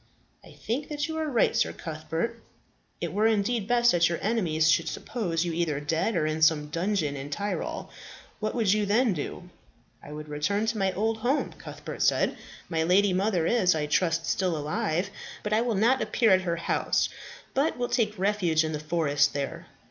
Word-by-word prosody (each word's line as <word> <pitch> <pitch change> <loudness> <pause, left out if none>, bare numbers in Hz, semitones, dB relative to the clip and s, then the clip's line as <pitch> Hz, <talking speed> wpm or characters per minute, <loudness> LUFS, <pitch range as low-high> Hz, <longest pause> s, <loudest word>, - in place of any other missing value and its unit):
"I - - -14
think 280 +7 -4
that 295 -1 -2
you 320 - -4
are 315 -1 -1
right, 240 -5 +2
Sir - - +1
Cuthbert. 160 +9 -4 0.6
It - - -3
were 215 +2 +3
indeed 220 0 +1
best 240 0 +4
that 170 -1 +3
your 170 - -1
enemies 175 -8 +1
should - - +2
suppose 180 -8 -2
you 170 - -2
either 160 -4 0
dead 165 +9 -1
or 160 -3 +1
in 155 +1 -2
some 155 -2 +3
dungeon 170 -3 0
in 135 0 -6
the - - -4
Tyrol. 205 0 -4 0.5
What 215 +2 -2
would 220 -5 +3
you 210 -1 0
then 225 +2 +3
do?" 175 +3 -6 0.5
"I 145 - -11
would 150 0 -7
return 155 +9 -1
to 225 0 -1
my 195 -1 +2
old 220 +3 0
home," 250 +6 0
Cuthbert - - -8
said. - - +2 0.3
"My 160 -2 -1
lady 185 +4 +3
mother 185 -3 +1
is, 185 -5 +3
I 150 -1 -1
trust, 165 +2 +1
still 180 -1 0
alive. 155 +4 -1 0.3
But 210 - -1
I 220 - +3
will 235 -2 0
not 235 +7 +3
appear 225 -4 +2
at 185 0 +5
her 170 -2 -1
house, 170 - 0 0.5
but 280 +4 +1
will 245 0 -1
take 220 -4 0
refuge 185 -5 +2
in 155 - -2
the 150 - -3
forest 150 -2 +1
there. 140 -1 -4
185 Hz, 195 wpm, -27 LUFS, 160-220 Hz, 0.6 s, at